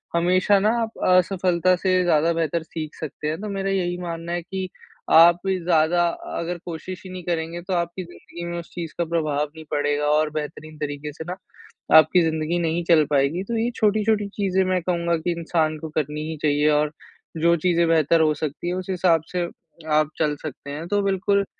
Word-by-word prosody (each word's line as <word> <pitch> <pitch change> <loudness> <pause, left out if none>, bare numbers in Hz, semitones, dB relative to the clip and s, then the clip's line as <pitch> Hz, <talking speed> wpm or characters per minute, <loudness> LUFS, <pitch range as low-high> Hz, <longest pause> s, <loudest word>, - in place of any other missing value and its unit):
हमेशा 185 +4 +3
ना 210 +2 +2
आप 225 0 -4
असफलता 185 -1 +3
से 185 0 +1
ज़्यादा 165 -1 +3
बेहतर 165 0 -1
सीख 155 -1 -7
सकते 150 -1 -6
हैं। 155 +2 -2
तो 210 - -4
मेरा 195 0 -2
यही 180 -2 -1
मानना 170 -1 -5
है 175 - -1
कि 185 +2 -5 0.4
आप 170 +1 +8
ज़्यादा 175 -2 +2 0.3
अगर 170 +1 -3
कोशिश 175 +2 -7
ही 185 - -8
नहीं 180 -1 -7
करेंगे, 170 0 -3
तो 185 +1 -4
आपकी 170 +1 -2
ज़िंदगी 170 0 -10
में 170 0 -4
उस 170 - -10
चीज़ 165 -3 -6
का 170 - 0
प्रभाव 155 -3 0
नहीं 160 0 -10
पड़ेगा 145 0 0
और 155 0 +2
बेहतरीन 155 +1 -6
तरीक़े 150 0 -4
से 160 - -7
ना, 180 - -3 0.6
आपकी 160 +3 +6
ज़िंदगी 160 +1 0
नहीं 170 +1 0
चल 165 -2 +5
पाएगी। 145 +6 +1
तो 230 +3 -3
ये 230 +2 +1
छोटी-छोटी 210 -1 +2
चीज़े 190 -2 +1
मैं 185 -1 +1
कहूँगा 170 -1 0
कि 165 +2 -2
इंसान 160 -2 0
को 160 - -6
करनी 150 0 -1
ही 160 - -5
चाहिए 150 0 +2
और 150 0 +2 0.5
जो 170 +2 +4
चीज़ें 170 -2 +3
बेहतर 165 0 +3
हो 155 -1 +3
सकती 150 +2 -4
है, 175 - 0
उस 185 0 -5
हिसाब 175 -3 +3
से 175 -1 -1 0.5
आप 155 0 +3
चल 150 -2 +1
सकते 140 -2 -7
हैं। 160 +4 -6
तो 205 +2 +1
बिल्कुल, 200 +1 +1
170 Hz, 195 wpm, -23 LUFS, 155-185 Hz, 0.6 s, आप